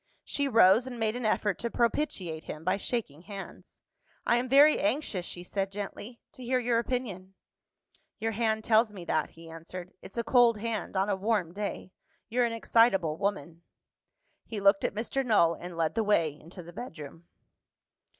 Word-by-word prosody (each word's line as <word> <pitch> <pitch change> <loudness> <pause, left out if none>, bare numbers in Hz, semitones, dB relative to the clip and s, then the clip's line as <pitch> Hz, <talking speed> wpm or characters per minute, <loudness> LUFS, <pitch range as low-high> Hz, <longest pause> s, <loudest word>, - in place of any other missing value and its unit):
She 285 -1 0
rose, 225 -1 +5
and 245 -2 -7
made 220 0 0
an 245 -3 -1
effort 205 -3 0
to 235 - -2
propitiate 225 - -1
him 155 - -7
by 185 +3 +1
shaking 200 - -4
hands. 195 +1 -10 0.4
"I 240 - +3
am 250 +1 -2
very 290 +3 +6
anxious," 275 - -1
she 175 - -7
said 195 +1 -3
gently, 205 +3 -7
"to 255 - -11
hear 255 +1 +1
your 240 -2 +1
opinion." 210 -7 -4 0.8
"Your 225 0 -1
hand 220 0 0
tells 220 0 +4
me 185 -4 -9
that," 155 -2 0
he 165 0 -14
answered. 175 +3 -9
"It's 195 - -11
a 235 - 0
cold 235 -1 +4
hand, 215 -2 -3
on 190 +1 +2
a 205 - +1
warm 190 -4 0
day. 200 -2 -5 0.4
You're 245 +1 +2
an 235 - -1
excitable 225 -8 +3
woman." 170 -5 -3 0.9
He 220 - -4
looked 200 0 +4
at - - -1
Mr. 240 +5 -1
Null, 205 -9 +4
and 175 0 -9
led 160 -2 0
the 225 - 0
way 170 -8 +2
into 170 +4 -11
the 175 +1 -12
bedroom. 165 - -9
205 Hz, 180 wpm, -29 LUFS, 180-235 Hz, 0.9 s, very